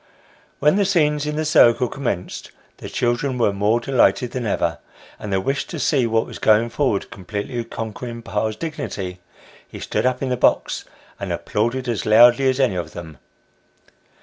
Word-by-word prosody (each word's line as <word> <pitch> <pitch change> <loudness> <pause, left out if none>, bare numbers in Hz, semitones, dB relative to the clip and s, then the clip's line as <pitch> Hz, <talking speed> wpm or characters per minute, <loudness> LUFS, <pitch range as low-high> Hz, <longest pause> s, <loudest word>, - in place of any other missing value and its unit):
When 150 +6 +3
the 205 - +3
scenes 150 -6 +1
in 150 - -2
the 155 +1 -1
circle 125 -5 +5
commenced, 120 -9 -4 0.3
the - - -8
children 125 +2 -1
were 115 -4 +2
more 105 +4 +1
delighted 125 -1 +2
than 125 -3 -3
ever; - - -1 0.4
and 105 - -6
the 95 - +2
wish 135 +9 -2
to - - -6
see 130 -6 +1
what 115 0 +1
was - - -10
going 110 +2 +3
forward, 115 -6 -1
completely 105 +6 -5
conquering 115 +1 -7
pa's 110 0 -2
dignity, 105 - -5 0.5
he - - -10
stood - - -1
up 130 +1 -1
in 135 - -1
the 125 - 0
box, - - +1 0.3
and - - -4
applauded 120 +4 -2
as 115 -3 -2
loudly 120 +4 +6
as 130 +1 -1
any 130 -7 +3
of 90 - -5
them. 80 -5 -9
120 Hz, 175 wpm, -21 LUFS, 105-135 Hz, 0.5 s, loudly